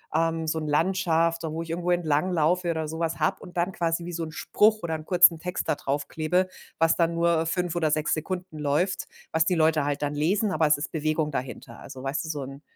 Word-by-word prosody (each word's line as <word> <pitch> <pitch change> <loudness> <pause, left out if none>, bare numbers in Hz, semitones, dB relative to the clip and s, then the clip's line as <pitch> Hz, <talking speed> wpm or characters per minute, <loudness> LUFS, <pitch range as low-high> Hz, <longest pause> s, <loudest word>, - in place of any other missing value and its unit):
ähm, 165 0 +1
so 160 +1 0
'n 155 - -4
Landschaft 165 +1 +1
so 160 -2 -4
wo 165 - -3
ich 165 - -12
irgendwo 175 +1 -1
entlanglaufe 175 +1 +1
oder 160 -1 -2
so 160 +1 -5
was 165 -1 -2
habe 155 - +2
und 180 - -12
dann 175 +2 +1
quasi 170 -1 -1
wie 175 - -5
so 165 0 -3
'n 160 - -6
Spruch 215 +6 +2
oder 165 -1 -2
'n 155 -1 -7
kurzen 175 -2 +6
Text 180 +2 -4
da - - +3
draufklebe, 155 +6 -1 0.3
was 165 0 +4
dann 170 -1 +2
nur 170 -1 +2
5 175 +1 -1
oder 160 -3 +1
6 155 0 +1
Sekunden 175 0 -4
läuft, 155 +6 0 0.2
was 160 0 +2
die 180 - +2
Leute 160 -2 +3
halt 145 0 -2
dann 145 0 -1
lesen, 195 +8 +1
aber 155 -2 +2
es 150 - +4
ist 145 - -5
Bewegung 155 -1 -1
dahinter. 130 -2 -6
Also, 130 - -10
weißt 135 +4 -2
du, - - -6
so 150 -3 -3
'n 135 +1 -9
165 Hz, 235 wpm, -26 LUFS, 155-175 Hz, 0.3 s, kurzen